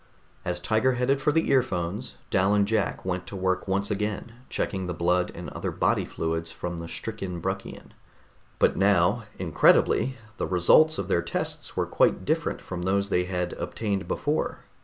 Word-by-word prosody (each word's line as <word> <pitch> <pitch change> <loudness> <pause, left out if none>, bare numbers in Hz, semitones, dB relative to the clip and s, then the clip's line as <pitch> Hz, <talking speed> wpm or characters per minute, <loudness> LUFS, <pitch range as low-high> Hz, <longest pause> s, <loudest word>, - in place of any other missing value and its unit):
As 90 0 -2
Tiger 110 +8 +2
headed 125 +3 +1
for 150 - +3
the 160 +2 +1
earphones, 105 -4 0 0.2
Dal 95 +2 +3
and 100 -1 +3
Jack 110 -3 0
went 90 -1 -2
to - - -7
work 95 0 0
once 100 +2 0
again, 105 +2 -2 0.2
checking 95 -2 -2
the 90 - -3
blood 90 +1 +1
and - - -6
other - - -3
body - - +1
fluids 80 0 -3
from 85 0 -5
the 85 - -6
stricken 95 -3 -5
Bruckian. 95 +3 -5 0.7
But - - +3
now, 100 +3 +3
incredibly, 95 - +3 0.2
the - - -2
results 125 - +5
of 95 - -3
their 85 -3 +2
tests - - -3
were - - +2
quite - - +2
different - - 0
from 90 -1 -6
those 100 +2 +1
they 90 -1 +2
had 90 -1 -2
obtained 100 -3 -3
before. 150 +2 -1
95 Hz, 170 wpm, -26 LUFS, 90-110 Hz, 0.7 s, results